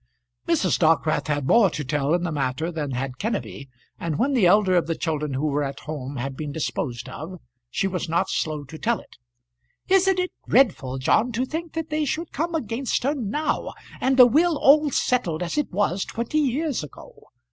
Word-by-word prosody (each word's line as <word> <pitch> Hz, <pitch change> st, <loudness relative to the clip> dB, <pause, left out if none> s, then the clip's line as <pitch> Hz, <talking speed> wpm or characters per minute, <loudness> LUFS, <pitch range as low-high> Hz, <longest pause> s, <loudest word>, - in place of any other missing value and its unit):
Mrs. -, -, +2 dB
Dockwrath 155 Hz, -2 st, +2 dB
had 145 Hz, -2 st, -1 dB
more 210 Hz, -, +5 dB
to 155 Hz, -2 st, -4 dB
tell 145 Hz, +3 st, +1 dB
in 175 Hz, -, -1 dB
the 175 Hz, -, -1 dB
matter 145 Hz, +3 st, -2 dB
than 155 Hz, -4 st, -3 dB
had 130 Hz, 0 st, -4 dB
Kenneby, 200 Hz, -, -4 dB, 0.3 s
and 160 Hz, -3 st, -2 dB
when 275 Hz, -, +1 dB
the 225 Hz, -9 st, +4 dB
elder 190 Hz, 0 st, +4 dB
of 175 Hz, -, +2 dB
the 165 Hz, -, -1 dB
children 150 Hz, -4 st, -2 dB
who 140 Hz, +4 st, -1 dB
were 145 Hz, -1 st, 0 dB
at 140 Hz, +1 st, -5 dB
home 145 Hz, -3 st, -6 dB
had 135 Hz, +1 st, -4 dB
been 150 Hz, +1 st, -5 dB
disposed 125 Hz, -5 st, -3 dB
of 160 Hz, +8 st, -8 dB, 0.3 s
she 160 Hz, -, -1 dB
was 180 Hz, -3 st, -3 dB
not 170 Hz, -, +1 dB
slow 155 Hz, -2 st, -2 dB
to 155 Hz, +3 st, -11 dB
tell 235 Hz, 0 st, 0 dB
it. -, -, -17 dB, 0.7 s
"Isn't 385 Hz, 0 st, +4 dB
it 365 Hz, 0 st, -1 dB, 0.2 s
dreadful, 135 Hz, -, +3 dB
John, 215 Hz, -, +2 dB
to 245 Hz, +3 st, 0 dB
think 320 Hz, +4 st, -5 dB
that 325 Hz, -1 st, -4 dB
they 305 Hz, 0 st, 0 dB
should 320 Hz, +4 st, -3 dB
come 330 Hz, +2 st, -2 dB
against 245 Hz, -3 st, -2 dB
her 280 Hz, +3 st, +2 dB
now, 290 Hz, +4 st, -2 dB, 0.2 s
and 265 Hz, +1 st, +1 dB
the 250 Hz, -, +10 dB
will 315 Hz, +6 st, +3 dB
all 295 Hz, +2 st, +5 dB
settled 185 Hz, -, 0 dB
as 175 Hz, -, -3 dB
it 295 Hz, -1 st, -1 dB
was 190 Hz, -1 st, 0 dB
twenty 235 Hz, +7 st, -2 dB
year 295 Hz, +3 st, 0 dB
ago? 150 Hz, -, -11 dB
180 Hz, 200 wpm, -24 LUFS, -, 0.7 s, the